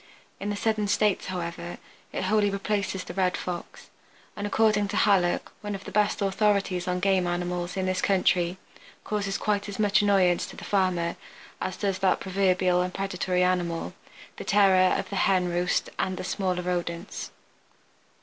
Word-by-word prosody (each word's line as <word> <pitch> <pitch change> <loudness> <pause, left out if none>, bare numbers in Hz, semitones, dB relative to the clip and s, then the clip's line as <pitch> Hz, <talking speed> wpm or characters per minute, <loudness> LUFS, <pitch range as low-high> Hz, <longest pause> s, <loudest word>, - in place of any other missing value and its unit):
In 200 - -3
the 205 - -1
southern 215 0 0
states, 205 -1 +1
however, 170 -1 -5 0.3
it - - -3
wholly 205 +1 +2
replaces 200 -1 -2
the - - -8
Red 185 -1 +1
Fox, 175 -1 -7 0.4
and, 205 0 -3
according 210 -1 +2
to 205 +1 -3
Hallock, 190 -5 +2
one 205 -1 -4
of 195 - -8
the - - -8
best 210 0 +1
authorities 195 -2 +1
on 180 0 0
game 190 -1 +2
animals 175 +1 -2
in 190 - 0
this 185 0 0
country, 185 -2 +2 0.5
causes 200 -2 -2
quite 205 -1 -1
as 200 - -6
much 210 -1 +3
annoyance 190 -4 +3
to - - -11
the - - -10
farmer 185 -4 0 0.4
as 185 - -3
does 195 -2 -1
that 190 -1 +2
proverbial 185 -2 +2
and 180 0 -3
predatory 185 -2 0
animal, 175 -2 0 0.4
the - - -6
terror 190 -3 +4
of - - -5
the 200 - -2
hen 185 -2 +3
roost 175 +1 0
and 185 -1 -1
the - - -4
smaller 185 -1 -1
rodents. 175 +1 -3
190 Hz, 170 wpm, -27 LUFS, 180-200 Hz, 0.5 s, terror